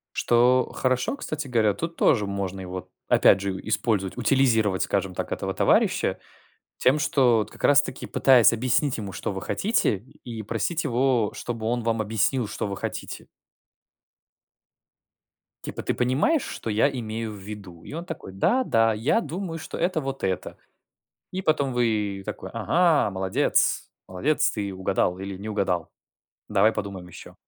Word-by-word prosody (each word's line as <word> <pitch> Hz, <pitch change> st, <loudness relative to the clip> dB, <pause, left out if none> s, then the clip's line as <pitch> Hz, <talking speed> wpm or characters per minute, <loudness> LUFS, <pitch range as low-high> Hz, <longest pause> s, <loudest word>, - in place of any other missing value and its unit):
Что 125 Hz, +2 st, +3 dB
хорошо, 130 Hz, -, 0 dB
кстати 155 Hz, -, -5 dB
говоря, 110 Hz, -4 st, +3 dB
тут 165 Hz, +6 st, -5 dB
тоже 105 Hz, -6 st, +3 dB
можно 100 Hz, -1 st, -4 dB
его 90 Hz, 0 st, -7 dB, 0.2 s
опять 95 Hz, -, +5 dB
же 95 Hz, -1 st, -3 dB
использовать, 110 Hz, -3 st, 0 dB
утилизировать, 115 Hz, -6 st, +2 dB
скажем 95 Hz, -2 st, -1 dB
так, -, -, -4 dB
этого -, -, -3 dB
товарища, -, -, +2 dB, 0.6 s
тем, 135 Hz, +4 st, +3 dB
что 130 Hz, -5 st, +3 dB
вот 110 Hz, -, -2 dB
как -, -, -14 dB
раз 140 Hz, -1 st, +6 dB
таки 130 Hz, -, -6 dB
пытаясь 125 Hz, -4 st, +5 dB
объяснить 130 Hz, +4 st, +1 dB
ему, 100 Hz, -3 st, -6 dB
что 100 Hz, -, -4 dB
вы 95 Hz, -, -5 dB
хотите, 205 Hz, -, +1 dB, 0.3 s
и 115 Hz, -3 st, -6 dB
просить 115 Hz, -, -2 dB
его, 120 Hz, -3 st, +1 dB
чтобы 115 Hz, -2 st, -5 dB
он 120 Hz, +1 st, 0 dB
вам 115 Hz, 0 st, 0 dB
объяснил, 110 Hz, +3 st, 0 dB
что 110 Hz, -, -3 dB
вы 100 Hz, -1 st, -4 dB
хотите. -, -, -6 dB, 2.4 s
Типа: -, -, -5 dB
ты -, -, -1 dB
понимаешь, 140 Hz, -, +2 dB
что 115 Hz, -, -5 dB
я 110 Hz, +7 st, +3 dB
имею 115 Hz, -3 st, -4 dB
в -, -, -9 dB
виду? 95 Hz, -4 st, -10 dB
И -, -, -10 dB
он 165 Hz, +3 st, -5 dB
такой: 135 Hz, -, -8 dB
да-да, 115 Hz, -, +2 dB
я 120 Hz, -, +1 dB
думаю, 175 Hz, -4 st, -5 dB
что 160 Hz, -, -7 dB
это 175 Hz, -1 st, 0 dB
вот 135 Hz, -1 st, -5 dB
это. 95 Hz, -1 st, -2 dB, 0.8 s
И 185 Hz, -, -2 dB
потом 145 Hz, -5 st, +1 dB
вы 105 Hz, -5 st, 0 dB
такой: 95 Hz, -, -6 dB
ага, 145 Hz, -, +2 dB
молодец, 95 Hz, 0 st, +1 dB, 0.2 s
молодец, 130 Hz, +11 st, +1 dB
ты 100 Hz, -3 st, -4 dB
угадал 95 Hz, -1 st, 0 dB
или 95 Hz, 0 st, -6 dB
не 105 Hz, +3 st, -7 dB
угадал, 95 Hz, -6 st, -1 dB, 0.6 s
давай 105 Hz, +2 st, +4 dB
подумаем 95 Hz, -4 st, -5 dB
еще. 90 Hz, -, -12 dB
115 Hz, 155 wpm, -25 LUFS, 100-135 Hz, 2.4 s, раз